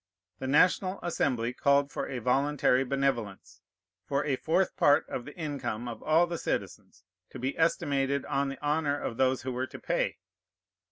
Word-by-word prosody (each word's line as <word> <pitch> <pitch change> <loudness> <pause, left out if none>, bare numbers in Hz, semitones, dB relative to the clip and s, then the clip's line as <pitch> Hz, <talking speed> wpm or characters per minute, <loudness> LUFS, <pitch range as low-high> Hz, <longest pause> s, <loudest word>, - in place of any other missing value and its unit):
The 130 - -4
National 185 +6 +3
Assembly 125 -8 0
called 140 +2 +2
for - - -3
a 130 - -4
voluntary 135 +2 +2
benevolence, 135 -7 -2 0.4
for 140 +7 -1
a 140 -3 +1
fourth 165 +7 0
part 145 0 +4
of 120 - -5
the - - -10
income 140 -7 -4
of 115 - -6
all 160 +3 +4
the 170 -1 -5
citizens, 95 -2 -4 0.3
to - - -9
be 130 +3 -2
estimated 140 -4 +1
on 140 0 0
the 135 +2 -7
honor 145 -1 +1
of 115 - -4
those 130 -1 +2
who 130 - -3
were 130 +1 -2
to - - -10
pay. - - -1
140 Hz, 170 wpm, -29 LUFS, 125-150 Hz, 0.4 s, part